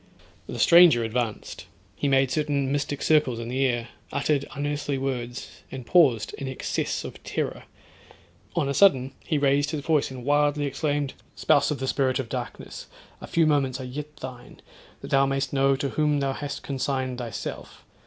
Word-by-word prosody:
The - - -6
stranger 170 -9 +7
advanced; 115 -1 -3 0.3
he 145 - -1
made 135 -1 +3
certain 140 -1 0
mystic 145 0 -2
circles 150 -6 +3
in 115 0 -5
the 130 +2 0
air, 120 -1 -2 0.2
uttered 140 0 0
unearthly 145 -1 -2
words, 125 -2 -5
and 130 -2 -7
paused 135 -11 +3
in 140 - -4
excess 130 - -2
of - - -9
terror. - - -3 0.9
On - - +1
a 140 - 0
sudden 135 -8 +4
he 155 - 0
raised 145 0 +2
his 150 -1 -3
voice 150 -1 +1
and 130 -2 -8
wildly 145 0 +2
exclaimed—'Spouse 145 0 0
of 150 - -1
the 130 0 -3
spirit 130 -1 +1
of 130 -4 -4
darkness, - - -6 0.3
a - - -8
few 165 -1 +2
moments 140 -4 +1
are - - -5
yet 150 +4 -7
thine; 125 -3 -10 0.4
that - - -9
thou 135 0 +4
may'st 135 0 -1
know 135 0 +3
to 140 +1 -2
whom 150 0 +1
thou 135 -1 0
hast 145 0 -6
consigned 130 -2 -2
thyself. 115 -4 -7
135 Hz, 170 wpm, -25 LUFS, 130-145 Hz, 0.9 s, stranger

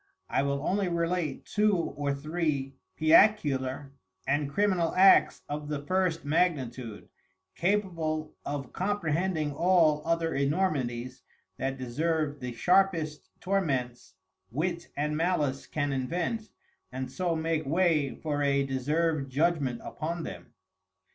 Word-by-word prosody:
I - - +2
will 140 +1 -1
only 195 0 +1
relate 170 -3 -1
Two 210 0 +2
or 145 -4 -2
Three 145 -2 -2 0.3
Piacular 145 -6 +3 0.3
and 145 +1 0
Criminal 185 -2 +1
Acts 195 +1 +6
of 150 0 -4
the 150 -1 -2
First 185 -3 0
Magnitude, 130 -9 -1 0.5
capable 165 -5 -1
of 140 -3 -5
comprehending 175 -4 -1
all 165 -2 +3
other 165 0 0
Enormities 135 -5 -1 0.4
that 135 0 -2
deserve 150 +3 -1
the 125 -1 -4
sharpest 170 +1 +1
Torments, 135 -11 -1 0.3
Wit 170 +6 -2
and 150 +1 0
Malice 155 -5 0
can 145 -2 -1
invent, 175 - -2 0.4
and 130 0 -5
so 175 +2 -1
make 160 -2 -1
way 160 -3 +2
for 145 -2 -2
a 140 -1 +2
deserved 140 +2 0
Judgment 145 -4 +1
upon 165 +2 -4
them. - - -9
155 Hz, 115 wpm, -29 LUFS, 140-175 Hz, 0.5 s, Acts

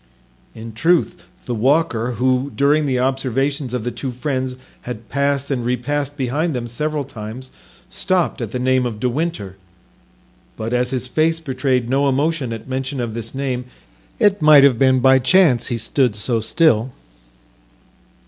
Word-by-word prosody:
In 115 0 -9
truth, 160 - +1 0.2
the 125 - -3
walker, 125 -1 +1
who, 130 +3 0
during 145 +2 +2
the 130 -2 0
observations 135 +1 -1
of 125 -3 -3
the 120 - -2
two 135 - -5
friends, 130 0 -3 0.3
had 115 -3 -8
passed 140 0 0
and 125 -3 -1
repassed 140 +4 -2
behind 145 +4 -1
them 120 -1 -3
several 150 +5 -3
times, 120 +2 -8 0.4
stopped 185 -5 -1
at 115 - -3
the 125 - -4
name 130 0 +1
of 110 -3 -6
De 125 - 0
Winter; 125 - -3 1.0
but 110 +2 -4
as 125 0 +1
his 130 -1 -2
face 160 +4 +1
betrayed 130 -4 -1
no 140 +2 +2
emotion 140 -1 0
at 115 0 -7
mention 130 +1 -3
of 120 -2 -3
this 115 +2 -6
name, 130 -2 -2 0.5
it 200 -3 +3
might 150 -2 +7
have 130 -5 +4
been 130 -1 +4
by 130 +1 +5
chance 140 -2 +3
he 120 - -2
stood 120 +1 0
so 115 +2 -1
still. 120 0 +2
130 Hz, 160 wpm, -19 LUFS, 120-145 Hz, 1.0 s, might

